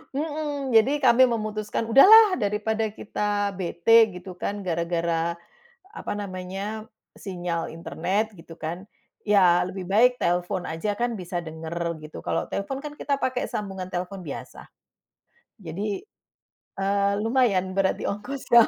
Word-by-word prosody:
Mhm. 290 Hz, -3 st, -3 dB
Jadi 265 Hz, +6 st, +4 dB
kami 255 Hz, +1 st, +6 dB
memutuskan, 215 Hz, -1 st, -2 dB
"Udahlah! 400 Hz, -, +8 dB
Daripada 215 Hz, +1 st, 0 dB
kita 205 Hz, -1 st, -2 dB
bete," 220 Hz, +6 st, +5 dB
gitu 180 Hz, 0 st, -9 dB
kan, 205 Hz, 0 st, -3 dB
"gara-gara," 170 Hz, -1 st, -1 dB, 0.6 s
apa -, -, -5 dB
namanya, 195 Hz, +3 st, -5 dB, 0.3 s
"sinyal 175 Hz, -3 st, -4 dB
internet," 190 Hz, +6 st, -2 dB
gitu 165 Hz, -1 st, -13 dB
kan. 165 Hz, +3 st, -5 dB, 0.4 s
"Ya, 185 Hz, -4 st, +4 dB
lebih 185 Hz, 0 st, -5 dB
baik 245 Hz, +6 st, +4 dB
telfon 175 Hz, +1 st, -1 dB
aja 200 Hz, +6 st, -3 dB
kan 240 Hz, -1 st, 0 dB
bisa 180 Hz, -3 st, -4 dB
denger," 160 Hz, 0 st, -6 dB, 0.2 s
gitu. 155 Hz, -, -9 dB
Kalo -, -, -2 dB
telpon 270 Hz, +7 st, -3 dB
kan 295 Hz, -1 st, -8 dB
kita 280 Hz, -, 0 dB
pake 255 Hz, -1 st, 0 dB
sambungan 195 Hz, -3 st, -5 dB
telpon 180 Hz, +1 st, -5 dB
biasa. 140 Hz, -, -8 dB, 1.0 s
Jadi, 195 Hz, -, -4 dB, 0.7 s
eee, 200 Hz, +1 st, +1 dB
lumayan, 225 Hz, -6 st, +2 dB
berat 190 Hz, 0 st, +1 dB
di -, -, -8 dB
ongkos. 250 Hz, +7 st, -4 dB
Loh? 235 Hz, -1 st, +8 dB
200 Hz, 130 wpm, -25 LUFS, 180-225 Hz, 1.0 s, Udahlah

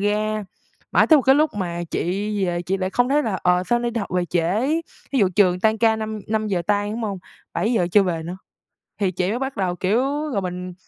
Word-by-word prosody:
ra, 210 Hz, +1 st, 0 dB, 0.5 s
mãi -, -, +5 dB
tới 315 Hz, -, +7 dB
một 275 Hz, -, +2 dB
cái 265 Hz, +1 st, +5 dB
lúc 305 Hz, +1 st, +3 dB
mà 175 Hz, -4 st, -3 dB
chị -, -, -1 dB, 0.5 s
về 175 Hz, 0 st, -2 dB
chị 190 Hz, +3 st, -1 dB
lại 185 Hz, 0 st, -2 dB
không 245 Hz, +4 st, +2 dB
thấy 295 Hz, +2 st, +3 dB
là, 215 Hz, -7 st, -1 dB
"Ờ, 180 Hz, 0 st, +3 dB
sao 240 Hz, +6 st, +2 dB
nay 240 Hz, 0 st, -1 dB
đi 230 Hz, -, -3 dB
học 200 Hz, -, -6 dB
về 180 Hz, -, +1 dB
trễ?" 180 Hz, +9 st, 0 dB, 0.4 s
Thí 270 Hz, -, +2 dB
dụ 195 Hz, -5 st, +4 dB
trường 180 Hz, -3 st, +4 dB
tan 220 Hz, +1 st, +2 dB
ca 225 Hz, -1 st, +3 dB
năm 220 Hz, -1 st, -4 dB
năm 215 Hz, 0 st, 0 dB
giờ 185 Hz, -4 st, -1 dB
tan, 205 Hz, 0 st, +1 dB
đúng 230 Hz, -, -4 dB
hông, 200 Hz, -3 st, -3 dB, 0.4 s
7:00 220 Hz, -6 st, +1 dB
chưa 205 Hz, -, +6 dB
về 170 Hz, -4 st, -2 dB
nữa. 175 Hz, +3 st, -6 dB, 0.6 s
Thì 195 Hz, -2 st, +1 dB
chị 180 Hz, +1 st, -1 dB
mới 230 Hz, +4 st, -1 dB
bắt 270 Hz, -2 st, -4 dB
đầu, 185 Hz, -3 st, 0 dB
kiểu, 200 Hz, +7 st, +1 dB, 0.3 s
rồi 200 Hz, -, 0 dB
mình, 180 Hz, 0 st, -5 dB
205 Hz, 245 wpm, -22 LUFS, 180-225 Hz, 0.6 s, tới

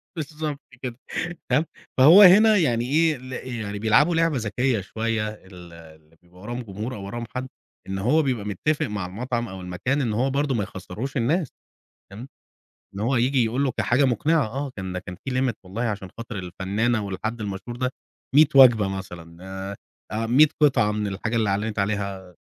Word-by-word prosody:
بالضبط 150 Hz, -2 st, -4 dB, 0.2 s
كده، 125 Hz, -2 st, -5 dB, 0.5 s
تمام، 145 Hz, +6 st, +3 dB, 0.3 s
فهو 160 Hz, +10 st, +9 dB
هنا 210 Hz, +3 st, +8 dB
يعني 120 Hz, -8 st, +1 dB
إيه 155 Hz, +4 st, +2 dB
ال 130 Hz, 0 st, -11 dB, 0.2 s
يعني 105 Hz, -2 st, -5 dB
بيلعبوا 135 Hz, +10 st, +4 dB
لعبة 165 Hz, -4 st, +2 dB
ذكيّة 115 Hz, +1 st, 0 dB
شوية، 110 Hz, +2 st, -2 dB
ال 90 Hz, -5 st, -13 dB
اللي 80 Hz, -1 st, -16 dB
بيبقى 90 Hz, +1 st, -19 dB
وراهم 120 Hz, +4 st, -5 dB
جمهور 110 Hz, +4 st, -6 dB
أو 100 Hz, -1 st, -7 dB
وراهم 120 Hz, +4 st, -5 dB
حد 130 Hz, +1 st, -3 dB, 0.4 s
إن 95 Hz, -, -2 dB
هو 125 Hz, +11 st, +3 dB
بيبقى 125 Hz, -7 st, -1 dB
متّفق 145 Hz, +10 st, -1 dB
مع 105 Hz, -3 st, -4 dB
المطعَم 120 Hz, +5 st, -3 dB
أو 95 Hz, -1 st, -8 dB
المكان 90 Hz, +11 st, -2 dB
إن 115 Hz, -5 st, -1 dB
هو 125 Hz, +5 st, +1 dB
برضه 140 Hz, -1 st, 0 dB
ما 105 Hz, -, 0 dB
يخسّروش 100 Hz, +9 st, -6 dB
الناس 150 Hz, +6 st, +1 dB, 0.6 s
تمام، 115 Hz, +6 st, -9 dB, 0.7 s
إن 100 Hz, -, -6 dB
هو 120 Hz, +4 st, +1 dB
ييجي 125 Hz, +1 st, +2 dB
يقول 125 Hz, +5 st, 0 dB
له 130 Hz, -, 0 dB
كحاجة 130 Hz, +4 st, +2 dB
مقنِعة 145 Hz, +2 st, +2 dB
آه، 135 Hz, +5 st, -4 dB
كان 95 Hz, -2 st, -4 dB
كان 90 Hz, -1 st, -8 dB
في 135 Hz, -, -3 dB
limit 125 Hz, -4 st, 0 dB
والله 100 Hz, +6 st, -5 dB
عشان 105 Hz, -5 st, -3 dB
خاطر 115 Hz, -2 st, -6 dB
الفنانة 100 Hz, +5 st, -1 dB
والحد 110 Hz, +4 st, -4 dB
المشهور 105 Hz, +3 st, -5 dB
ده 125 Hz, +1 st, -1 dB, 0.4 s
100 155 Hz, +1 st, +8 dB
وجبة 120 Hz, -7 st, +7 dB
مثلًا 90 Hz, -4 st, -7 dB
آآ 95 Hz, +1 st, -6 dB, 0.4 s
آآ 115 Hz, +1 st, -1 dB
100 140 Hz, +6 st, +6 dB
قِطعة 105 Hz, -7 st, +4 dB
من 105 Hz, 0 st, -2 dB
الحاجة 105 Hz, +4 st, -3 dB
اللي 110 Hz, -3 st, +1 dB
أعلنِت 105 Hz, +2 st, -2 dB
عليها 100 Hz, -3 st, -3 dB
115 Hz, 180 wpm, -24 LUFS, 100-130 Hz, 0.7 s, فهو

